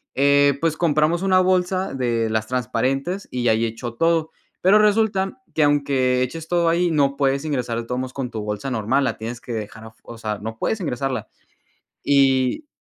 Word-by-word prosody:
Eh, 140 0 +4
pues 160 -1 0
compramos 160 +1 +1
una 190 -1 +4
bolsa, 185 0 +1
de 120 -3 0
las 110 0 -1
transparentes, 130 - -2
y 125 -1 -1
ahí 110 +1 +2
echó 115 +1 -5
todo. 165 +3 +1 0.3
Pero 195 +4 +5
resulta, 210 +1 +1
que 155 - +3
aunque 140 -3 +2
eches 160 +5 -5
todo 170 -1 +2
ahí, 170 +1 +2
no 140 -3 +1
puedes 140 0 +1
ingresar 125 -6 -2
de 115 - -6
todos 125 +2 -3
modos, 130 0 -5
con 135 -3 -4
tu 110 - -4
bolsa 105 +4 -4
normal. 125 +4 +1
La - - -2
tienes 115 +2 -6
que - - -9
dejar 110 0 -6
afu 110 0 -14
o 115 - -10
sea, 110 -2 -3
no 110 +1 -6
puedes 220 - -1
ingresarla. 135 -3 -3 0.8
Y 135 - +2
135 Hz, 185 wpm, -22 LUFS, 120-165 Hz, 0.8 s, Pero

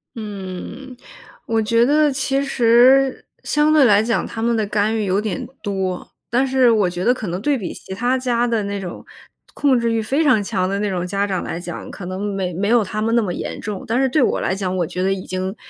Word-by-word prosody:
嗯， 210 +5 -7 0.5
我 225 -1 +1
觉 230 +2 +3
得 295 +2 +3
其 270 0 0
实 260 +1 +4 0.2
相 300 +1 +2
对 305 -3 +6
来 210 -3 +5
讲， 225 0 0
他 225 - -6
们 235 0 +1
的 215 - 0
干 210 +2 0
预 215 - -1
有 195 +2 +1
点 210 -5 -4
多。 190 -3 -3 0.2
但 255 +3 +2
是 260 -2 +4
我 205 -5 +2
觉 175 +1 -4
得 245 - +4
可 220 -6 -6
能 180 +3 -3
对 285 +4 +1
比 195 -7 -5
其 190 - -9
他 245 +6 0
家 245 -2 0
的 230 -3 0
那 200 0 -3
种 180 -3 -7 0.5
控 265 -4 +2
制 235 0 0
欲 225 - +1
非 275 +9 0
常 220 -8 +3
强 185 -3 -1
的 200 +1 -1
那 210 - 0
种 180 -1 -2
家 200 +2 -1
长 185 -2 -2
来 170 - -4
讲， 175 -1 -7
可 180 - -8
能 185 +2 -5
没 185 -2 -2
没 195 +4 -1
有 235 -2 +4
他 210 +2 -4
们 230 +2 +1
那 235 - +4
么 180 -4 -2
严 - - -5
重， 205 -2 -5
但 240 +4 +1
是 265 - +2
对 295 +2 +2
我 - - +2
来 - - 0
讲， 185 -2 -2
我 175 - +1
觉 180 +3 -5
得 195 - +1
已 190 -1 -6
经， 185 +2 -3
215 Hz, 260 characters per minute, -20 LUFS, 190-245 Hz, 0.5 s, 对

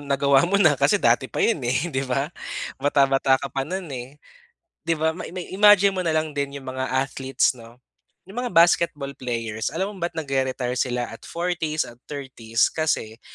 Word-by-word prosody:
nagawa 140 +3 +4
mo 200 - +1
na 175 -7 +5
kasi 140 +8 +4
dati 120 -5 +2
pa - - -2
'yon 225 -10 +2
eh, 140 +7 0
di 135 - -1
ba. 135 +5 -1 0.5
Bata-bata 135 -1 +3
ka 135 -1 -5
pa 135 +1 -2
no'n 190 +2 -3
eh. 125 0 -6 0.7
Di 165 -1 -1
ba 160 +1 +1
may 180 - -7
ma-imagine 195 +2 +4
mo 185 - -2
na 170 - -1
lang 155 -1 0
din 140 0 -3
'yung 135 - -11
mga 130 0 -3
athletes 135 0 0
'no. 115 0 -14 0.5
'Yung 215 +6 -5
mga 245 - -2
basketball 165 -5 +3
players 115 -4 -3
alam 190 +7 -3
mo 190 - -12
ba't 170 -1 -3
nag-re-retire 130 -4 -1
sila 125 -2 -2
at - - -11
40s 170 -3 -1
at 120 +1 -14
30s 125 -6 -1
kasi 120 -8 -2
140 Hz, 185 wpm, -23 LUFS, 130-170 Hz, 0.7 s, na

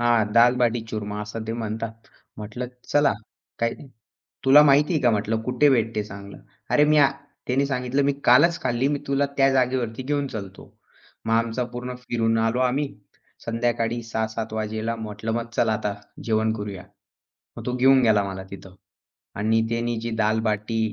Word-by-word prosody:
हां. 120 -1 +3
दाल-बाटी-चूरमा 115 -3 +2
असं 110 +2 -6
ते 110 - -2
म्हणतात. 110 -1 -4 0.4
म्हटलं, 110 +4 -6 0.2
"चला, 145 -1 +4 0.5
काही, 115 0 0 0.7
तुला 140 +3 +8
माहिती 145 +3 +4
आहे 155 - 0
का," 120 - +5
म्हटलं, 110 +1 0
"कुठे 125 +5 +2
भेटते 115 -4 +1
चांगलं." 100 -1 -10 0.3
अरे 150 - +5
मी, 155 - +5 0.5
त्याने 135 +2 +1
सांगितलं, 130 0 -1
"मी 140 0 +2 0.2
कालच 165 +7 +5
खाल्ली 125 +1 +1
मी 145 0 0
तुला 140 +1 +1
त्या 135 0 +4
जागेवरती 125 -2 0
घेऊन 145 +1 -1
चालतो." 100 -5 -9 0.5
मग 115 - 0
आमचा 115 +2 0
पूर्ण 125 +1 -5
फिरून 115 -2 0
आलो 115 +2 +1
आम्ही, 130 +3 +1 0.6
संध्याकाळी 115 0 -1
6:00-7:00 110 -1 -3
वाजेला. 110 +1 -3
म्हटलं, 110 0 -5
"मग 115 +1 -2
चला 110 - +2
आता 105 -1 -2 0.3
जेवण 110 -1 +1
करूया." 100 -3 -6 0.7
मग - - -8
तो 125 - -1
घेऊन 130 +1 +5
गेला 110 -3 +4
मला 95 -1 -5
तिथं 95 -1 -11 0.6
आणि 110 +2 +2
त्यानी 115 0 -1
जी 115 +1 -4
दाल-बाटी, 110 0 0
115 Hz, 155 wpm, -24 LUFS, 110-125 Hz, 0.7 s, तुला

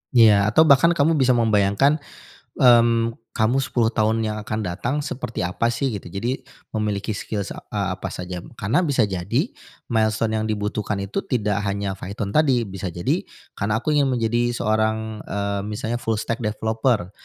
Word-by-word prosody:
Ya, 105 -4 +6
atau 120 +10 +5
bahkan 160 +3 +5
kamu 155 +1 +3
bisa 130 -2 +4
membayangkan, 115 +6 +3 0.6
mmm, 115 -2 +5 0.2
kamu 115 +4 +2
10 120 -4 +1
tahun 110 0 +1
yang 110 0 -2
akan 110 +1 -3
datang 100 +8 -2
seperti 120 -6 -4
apa, 90 +6 0
sih, 120 +2 -1
gitu. 100 -4 -6
Jadi, 115 +9 -3 0.3
memiliki 105 -1 -1
skills, 100 -1 -4
a 100 -2 -3
apa 95 - -5
saja, 90 0 -6 0.2
karena 110 - +1
bisa 145 -10 +2
jadi 95 -2 -1 0.4
milestone 110 0 +1
yang 110 - -2
dibutuhkan 105 0 -2
itu 100 - -2
tidak 105 -5 0
hanya 100 0 -2
Python 100 +2 -5
tadi, 135 -6 +3
bisa 95 -2 -5
jadi 85 0 -1 0.3
karena 105 +2 -1
aku 155 - +1
ingin 145 -2 +3
menjadi 120 -1 +1
seorang, 110 0 0
eee, 100 0 -2
misalnya 110 +3 -3
full 110 -2 -1
stack 115 +2 -3
developer 110 -2 0
110 Hz, 160 wpm, -22 LUFS, 100-120 Hz, 0.6 s, Ya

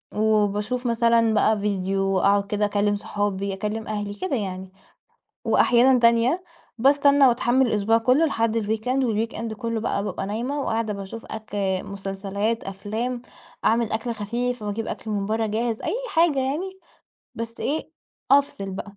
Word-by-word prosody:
وباشوف 215 +3 +1
مثلًا 230 -1 +3
بقى 215 0 +3
فيديو، 195 -1 0
أقعد 200 +1 +3
كده 210 0 0
أكلم 205 0 +1
صحابي، 200 -1 -2
أكلم 210 +3 -4
أهلي 205 -1 -3
كده 320 - -2
يعني. 190 -4 -4 0.7
وأحيانًا 250 +1 +4
تانية 235 +8 +3 0.4
باستنى 280 +2 +5
واتحمّل 245 +1 +3
الأسبوع 220 0 +2
كله 255 +8 +3
لحد 230 -5 0
الweekend 225 +5 -1
والweekend 225 0 -2
كله 230 0 -3
بقى 200 -2 -1
بابقى 205 - -3
نايمة 240 +8 -2
وقاعدة 225 -4 -1
باشوف 200 +3 -7
أك 220 0 -8 0.3
مسلسلات، 200 +3 -3
أفلام، 220 +6 -4 0.4
أعمل 230 0 +2
أكل 220 +2 -2
خفيف 235 +3 -3
واجيب 210 +2 -3
أكل 220 - -5
من 200 -2 -1
برا 220 +1 0
جاهز، 225 +1 -2
أي - - -1 0.2
حاجة 325 -4 +3
يعني 320 +9 -2 0.6
بس 230 0 -6
إيه 310 +3 -2 0.4
أفصل 275 -8 +2
بقى. 200 +1 -7
220 Hz, 140 wpm, -24 LUFS, 205-245 Hz, 0.7 s, باستنى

